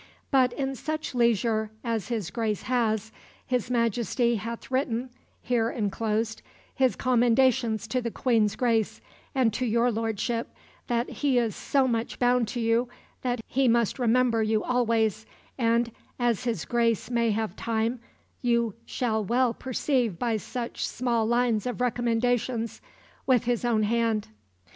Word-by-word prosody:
But 260 -3 +4
in 270 0 -2
such 310 +3 -4
leisure 230 -2 +2
as 230 -4 -2
his 220 -8 -3
Grace 215 -1 -2
has, 220 -4 0 0.3
his 250 -2 -1
Majesty 235 0 +1
hath 230 +4 -6
written 255 -2 -1 0.3
(here 230 -2 +1
enclosed) 220 0 -1 0.3
his 260 -2 +2
commendations 245 -2 +2
to 255 +2 0
the 235 - -2
Queen's 225 -3 +1
Grace 230 -4 +1 0.4
and 245 -5 +3
to 255 - -2
your 235 +1 +2
lordship, 225 +1 -2 0.3
that 240 0 0
he 280 -4 0
is 230 -3 +1
so 270 -2 +1
much 230 -2 -2
bound 245 -1 +3
to 240 - -4
you 230 +1 +1 0.3
that 245 -2 -1
he 265 0 +1
must 235 +1 +2
remember 240 -1 +3
you 215 0 +1
always, 225 -3 +1 0.3
and, 235 0 +2 0.3
as 240 -1 0
his 225 -8 -1
Grace 235 -1 +1
may 235 -1 +2
have 215 -2 -1
time, 230 +2 -1 0.4
you 235 -3 +1
shall 220 -4 -1
well 240 +3 +2
perceive 250 - -1
by 235 +1 0
such 235 +3 -4
small 235 -3 0
lines 235 -2 +1
of 245 - -3
recommendations 240 -1 0 0.5
with 250 -3 +4
his 240 -1 0
own 230 -3 +2
hand." 225 -1 +1
235 Hz, 145 wpm, -27 LUFS, 225-250 Hz, 0.5 s, But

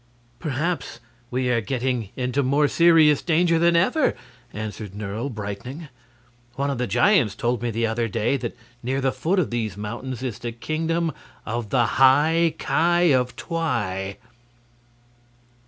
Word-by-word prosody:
"Perhaps 150 -3 -3 0.3
we 125 0 -1
are 120 -2 +2
getting 125 -1 -2
into 125 +2 0
more 140 +3 +2
serious 160 -3 +5
danger 170 0 +2
than 170 0 +4
ever," 250 - +2 0.4
answered 105 -2 -6
Nerle, 105 +5 -4
brightening; 120 +8 -6 0.7
"one 140 +1 -1
of 135 - -4
the 125 - 0
giants 150 - +3
told 120 0 -1
me 120 - -1
the 115 +1 0
other 115 +1 -1
day 105 +5 0
that 120 -3 -4 0.2
near 130 +3 -1
the 135 -1 +1
foot 180 +9 -1
of 180 -9 +1
these 110 -5 -2
mountains 120 +4 -5
is 120 -4 -4
the 120 -1 -4
Kingdom 160 +6 -1 0.3
of 115 -1 -3
the 120 0 +3 0.2
High 155 +5 +5
Ki 175 +1 +2
of 125 -1 +1
Twi." 105 - -2
130 Hz, 145 wpm, -23 LUFS, 115-160 Hz, 0.7 s, serious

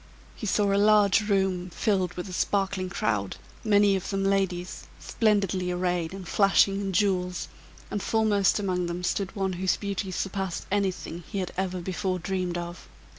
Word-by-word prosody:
He 215 - -5
saw 200 0 +2
a 200 - +3
large 210 0 +4
room 190 -2 +1
filled 185 -1 0
with 180 +2 -5
a 185 - -8
sparkling 195 -1 0
crowd, 110 - -1 0.3
many 205 -2 +4
of 190 - -3
them 195 -1 -1
ladies, 190 -2 -1
splendidly 195 -5 +1
arrayed 180 -2 -1
and 190 -2 -8
flashing 195 0 +3
in 195 -1 -2
jewels, 180 -2 0 0.4
and 205 - -2
foremost 210 -4 +2
among 185 -4 -1
them 175 +1 -4
stood 190 +1 -1
one 190 -2 -1
whose 185 +1 0
beauty 200 -1 -3
surpassed 190 -1 -3
anything 185 -4 -1
he 205 - -3
had 185 -2 -2
ever 185 -1 -2
before 185 +1 -2
dreamed 180 -1 -2
of. 175 0 -7
190 Hz, 165 wpm, -27 LUFS, 180-200 Hz, 0.4 s, large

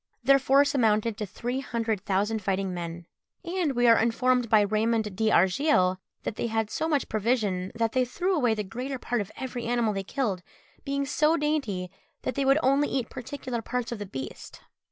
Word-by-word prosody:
Their 275 +2 +6
force 275 +2 +4
amounted 225 -3 +2
to 210 - -3
three 245 +7 -3
hundred 230 -6 -2
thousand 205 +3 0
fighting 190 -1 -1
men; 170 -1 -6 0.4
and 345 -4 -1
we 245 -1 +2
are 230 -1 +7
informed 245 +1 +2
by 215 -1 +6
Raymond 215 0 0
d'Argilles, 190 - +3 0.3
that 215 - -4
they - - -1
had 220 -1 -1
so 320 - -1
much 290 -3 +1
provision, 210 -4 0
that 230 -1 0
they 255 +1 +2
threw 355 +10 -1
away 245 -8 +2
the 210 - -2
greater 250 +7 -5
part 245 -2 -1
of 205 - -7
every 250 -2 -5
animal 235 -2 +1
they 195 - -2
killed, 195 -2 -2 0.4
being 280 -1 -1
so 305 +3 +2
dainty, 270 - -1 0.3
that - - -1
they 275 +3 -1
would 275 +2 +5
only 275 +3 +3
eat 260 -3 -2
particular 255 -1 -5
parts 245 +1 -3
of 235 - -4
the 205 - -5
beast. 135 -7 -8
230 Hz, 190 wpm, -27 LUFS, 210-270 Hz, 0.4 s, are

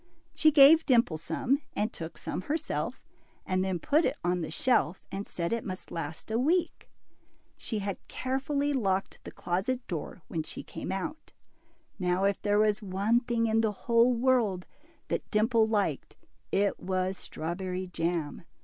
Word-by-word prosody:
She 310 0 +5
gave 305 +2 +7
Dimple 235 - +4
some, 275 - 0
and 215 +2 -1
took 165 0 -7
some - - -4
herself, 315 +1 -2 0.4
and 185 0 +1
then 190 -1 -1
put 305 - +2
it - - 0
on 180 0 +1
the 160 - -3
shelf, 195 - +1
and 195 +1 -4
said 170 +3 -2
it 230 - -1
must 185 -1 -7
last 160 +5 -5
a 225 - +1
week. 330 +7 0 0.7
She 220 - -3
had 200 -2 -3
carefully 280 +2 -1
locked 195 -7 -1
the - - -7
closet 220 +8 -2
door 165 0 -5
when 160 - -2
she 155 - -7
came - - -6
out. 305 +12 -5 0.7
Now 180 +1 +1
if 200 0 +1
there 205 0 +2
was 210 0 +3
one 205 +4 +2
thing 235 -2 0
in 225 0 +3
the 220 -2 +1
whole 235 +1 +4
world 235 -7 +2 0.4
that - - -2
Dimple 225 +1 +3
liked, 205 -10 -1 0.4
it 200 +1 +1
was 185 0 -1
strawberry 180 +3 -4
jam. 170 -3 -2
205 Hz, 160 wpm, -29 LUFS, 185-250 Hz, 0.7 s, gave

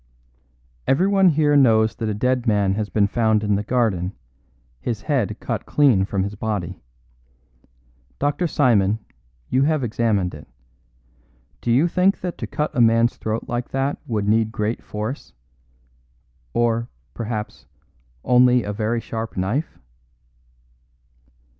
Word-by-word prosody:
"Everyone 190 +6 +4
here 150 -2 +2
knows 110 -5 +4
that 110 - -2
a 105 - -2
dead 125 +2 0
man 100 -3 +2
has 105 0 -2
been 105 -2 +2
found 110 0 +1
in 105 -1 +1
the 100 - +1
garden, 105 -6 0 0.7
his 105 - -4
head 130 -9 0
cut - - -4
clean 130 -10 +3
from 100 -1 -1
his 100 +1 -4
body. 105 - -4 1.4
Dr. 145 +5 0
Simon, 110 -9 +2 0.5
you 130 - +3
have 150 0 +1
examined 110 -5 0
it. 75 - -11 1.1
Do - - -3
you 135 +8 +4
think 185 +3 +2
that 180 -1 -5
to - - -4
cut 150 0 -3
a 125 - +3
man's 115 +1 +3
throat 110 +1 -3
like 120 +1 -3
that 135 +2 -1
would 105 -4 -1
need 110 +1 +2
great 110 +1 -2
force? 110 +6 -6 1.2
Or, 115 0 +1 0.2
perhaps, 105 - -5 0.6
only 125 -1 +4
a 105 - -4
very 110 +2 -1
sharp 115 -2 -6
knife?" 105 - -2
115 Hz, 135 wpm, -22 LUFS, 105-130 Hz, 1.4 s, Everyone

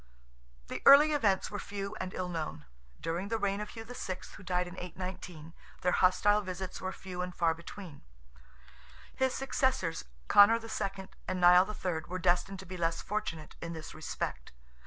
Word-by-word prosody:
The - - -5
early 290 +3 +9
events 210 -10 +2
are 205 - -4
few 200 0 -5
and 185 0 -4
ill 185 - -2
known. 155 - -4 0.3
During 170 +4 -2
the 225 +2 0
reign 200 -1 0
of 210 - -5
Hugh 225 - -8
VI., 220 -6 -5 0.2
who - - -12
died 180 -1 0
in 175 - -8
819, 180 -3 -7 0.3
their 180 - +2
hostile 200 +4 +4
visits 185 -1 -6
were 190 - -2
few 185 -2 -6
and 180 0 -4
far 165 -2 +3
between; 170 -1 -10 1.1
his 260 -1 +1
successors, 260 - 0 0.2
Conor 225 +3 +7
II. 195 -4 -4 0.2
and 185 0 -1
Nial 180 +2 +7
III., 180 -6 -3
were 185 - -3
destined 185 +2 +1
to - - -11
be 185 +1 -7
less 165 -1 0
fortunate 190 -7 -4
in 170 0 -4
this 160 -1 -8
respect. 60 - -5
185 Hz, 170 wpm, -31 LUFS, 175-205 Hz, 1.1 s, early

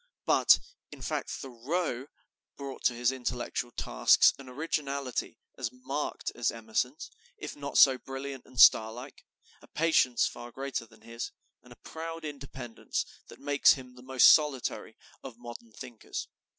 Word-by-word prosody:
But, - - +6 0.3
in - - -10
fact, - - -3
Thoreau 135 +1 -3 0.5
brought 140 -1 -7
to 120 - +3
his 120 +1 +2
intellectual 125 -1 -3
tasks - - +4
an 135 -2 -10
originality 140 -2 -3 0.2
as 120 -3 -2
marked 130 +4 -4
as 120 - 0
Emerson's, 115 +5 -3 0.3
if - - -7
not 140 -1 -4
so 130 -2 +7
brilliant 135 0 -7
and 130 -2 -9
star 110 0 +8
like 125 +4 -10 0.4
a - - -17
patience 155 -7 +2
far 120 0 -6
greater 135 -3 -4
than 110 0 -21
his, 115 +1 -6 0.3
and - - -19
a - - -11
proud 165 0 -7
independence 135 -5 -5 0.2
that - - -13
makes 145 0 +5
him 130 -2 -9
the 125 - -14
most 130 0 +7
solitary 150 -5 -1 0.3
of 130 -4 -9
modern 120 -1 -10
thinkers. 115 +1 -7
130 Hz, 150 wpm, -30 LUFS, 120-140 Hz, 0.5 s, star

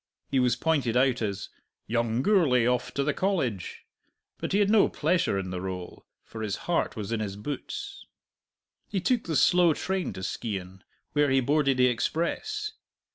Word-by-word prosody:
He 135 - +3
was 125 -2 +3
pointed 140 -7 +1
out 130 -1 +3
as 100 -3 -3 0.4
"Young 115 +1 0
Gourlay 155 - +4
off 125 0 0
to 140 - +1
the 145 +1 +1
College." 135 - -2 0.5
But - - -3
he 195 - +3
had 205 0 +3
no 220 -2 +5
pleasure 160 - +1
in 95 -1 -3
the 90 - -3
rôle, 90 -1 -6 0.2
for 110 - -9
his 105 -2 -1
heart 175 - 0
was 105 -2 -5
in 115 - 0
his 100 -3 -3
boots. 395 - -6 0.8
He 195 - -1
took 235 +5 +1
the 160 - -2
slow 175 0 +5
train 190 -1 -2
to 95 - -7
Skeighan, 95 -3 -4 0.3
where 145 -1 +3
he 135 0 +4
boarded 140 0 +2
the 125 - +5
express. 170 - -1
130 Hz, 175 wpm, -27 LUFS, 110-175 Hz, 0.8 s, no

